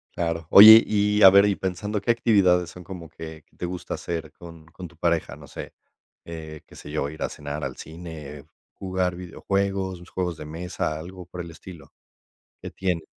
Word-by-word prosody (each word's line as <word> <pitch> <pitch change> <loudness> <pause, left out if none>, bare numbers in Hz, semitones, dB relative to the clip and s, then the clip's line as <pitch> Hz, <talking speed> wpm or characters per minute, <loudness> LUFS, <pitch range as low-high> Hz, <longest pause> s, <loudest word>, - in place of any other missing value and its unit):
Claro. 85 -1 -3
Oye, 110 +3 +11
y 105 0 +1
a 95 - +11
ver, 100 +1 +6
y 100 -1 +1
pensando, 95 +3 -3
¿qué 100 - -7
actividades 95 -7 +2
son 90 - -12
como 85 -2 -9
que 80 -1 -10
que - - -33
te - - -5
gusta 90 0 -6
hacer 80 -2 -5
con 85 -2 -13
con 90 +2 -10
tu 85 0 -21
pareja? 85 -1 -1
No - - -14
sé. - - -9 0.5
Eh, 80 -2 -9
qué - - -17
sé 75 - -11
yo, 75 -2 -2
ir 80 +2 -9
a - - -2
cenar, 75 +1 -6
al 65 -1 -5
cine, 80 -4 -10 0.3
jugar 95 -2 -2
videojuegos, 95 +1 -2
sus 85 +1 -15
juegos 90 -2 -3
de 75 - -9
mesa, 80 0 -4
algo 90 +3 -10
por 90 0 -9
el 85 -1 -7
estilo. 85 0 -13 0.7
¿Qué - - -8
tienen? 90 -4 -2
90 Hz, 195 wpm, -24 LUFS, 80-95 Hz, 0.7 s, Oye